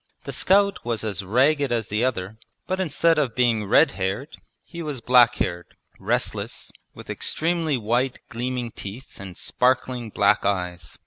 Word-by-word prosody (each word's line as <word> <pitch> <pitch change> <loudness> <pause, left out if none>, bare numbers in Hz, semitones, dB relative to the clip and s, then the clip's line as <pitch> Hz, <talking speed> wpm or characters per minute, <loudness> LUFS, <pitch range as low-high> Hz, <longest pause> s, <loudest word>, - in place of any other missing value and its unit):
The - - -6
scout 200 +1 +2
was 115 -2 -2
as 100 -4 -2
ragged 135 +7 +2
as 115 -3 -1
the 105 +3 0
other, 110 -4 -2 0.3
but 185 0 -2
instead 165 -2 +2
of 130 -6 -1
being 120 -4 +2
red 140 +9 +5
haired 100 +9 -3 0.3
he 170 - -9
was 150 -5 -4
black 120 0 +5
haired, 90 -1 -3 0.2
restless, - - -2 0.2
with - - -11
extremely 165 -3 0
white 120 +3 0
gleaming 120 0 -3
teeth 105 +8 -9
and 95 -2 -9
sparkling 125 -2 0
black 100 -1 +2
eyes. 90 -4 -2
120 Hz, 150 wpm, -24 LUFS, 105-140 Hz, 0.3 s, red